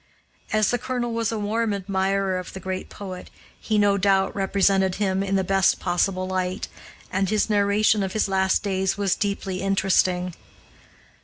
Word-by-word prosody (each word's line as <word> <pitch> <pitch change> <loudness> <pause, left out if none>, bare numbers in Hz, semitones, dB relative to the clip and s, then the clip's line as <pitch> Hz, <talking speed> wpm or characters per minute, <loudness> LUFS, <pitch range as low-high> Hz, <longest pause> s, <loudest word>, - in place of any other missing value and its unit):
As 215 -2 +2
the 245 - 0
colonel 245 -1 -3
was 230 -1 -1
a 225 - -2
warm 215 +1 -1
admirer 195 -1 0
of 185 - -9
the 190 - -6
great 190 +1 -5
poet, 185 -3 -8 0.3
he 215 - -1
no 200 -1 +3
doubt 195 0 +2
represented 195 -1 +2
him 195 -2 0
in 195 0 -1
the 190 - +2
best 195 0 +2
possible 185 +1 0
light, 185 -1 -2 0.4
and 190 0 0
his 215 0 +1
narration 205 +1 +3
of 190 -1 -2
his 215 - +1
last 190 0 +1
days 190 -1 0
was 200 -2 +1
deeply 195 -2 -3
interesting. 185 -2 +1
195 Hz, 165 wpm, -24 LUFS, 190-205 Hz, 0.4 s, no